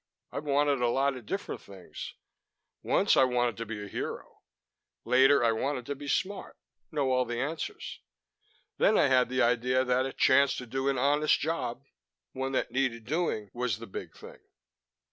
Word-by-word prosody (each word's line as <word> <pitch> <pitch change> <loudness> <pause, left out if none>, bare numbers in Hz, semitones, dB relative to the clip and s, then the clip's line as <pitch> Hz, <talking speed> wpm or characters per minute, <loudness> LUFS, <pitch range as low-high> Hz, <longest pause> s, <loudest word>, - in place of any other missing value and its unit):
I've 150 - -5
wanted 145 -2 +2
a 120 - +3
lot 135 +3 +1
of 125 -4 -10
different 195 +1 -4
things. 95 -2 -10 0.7
Once - - +3
I - - +6
wanted 125 -2 +1
to 115 0 -5
be 105 -2 -5
a - - -7
hero. - - -6 0.7
Later, 135 +1 +5
I 115 - +4
wanted 125 +2 -2
to 145 - -3
be 145 +1 -9
smart, 190 +7 -2 0.3
know 140 -4 0
all 130 0 +3
the 120 -1 -4
answers. 150 +3 -4 0.8
Then - - +4
I 140 - +4
had 130 -2 +4
the 130 +1 +2
idea 125 +2 +2
that 125 +1 +1
a - - -5
chance 140 +1 +4
to 125 - -5
do 135 +3 -1
an 135 - 0
honest 145 +4 +3
job, 135 -5 -3 0.5
one 135 +1 -3
that - - -1
needed 125 -4 -1
doing, 145 - -1
was 120 -4 -1
the 115 - -9
big 95 - -8
thing. - - -12
130 Hz, 180 wpm, -29 LUFS, 120-140 Hz, 0.8 s, I